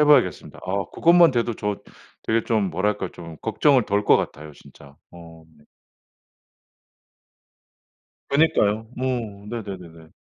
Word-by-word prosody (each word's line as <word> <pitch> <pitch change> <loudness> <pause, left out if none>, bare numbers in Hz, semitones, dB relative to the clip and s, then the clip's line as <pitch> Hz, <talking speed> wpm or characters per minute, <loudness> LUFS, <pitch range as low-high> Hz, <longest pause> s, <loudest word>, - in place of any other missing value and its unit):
해 150 - +6
봐야겠습니다. 130 -12 +2
아 95 +1 -1
그것만 170 -1 +5
돼도 120 -1 0
저 105 -1 -3 0.5
되게 115 0 0
좀 110 -4 +1
뭐랄까 95 +1 -1
좀 85 -2 -10
걱정을 130 +2 +3
덜 100 +1 0
거 - - +6
같아요, 75 +1 -5
진짜. 70 0 -17 0.2
어. 85 -1 -14 2.8
그러니까요. 110 -8 +2
어 120 -6 -3
네네네네. 90 -8 -8
105 Hz, 245 characters per minute, -23 LUFS, 85-120 Hz, 2.8 s, 해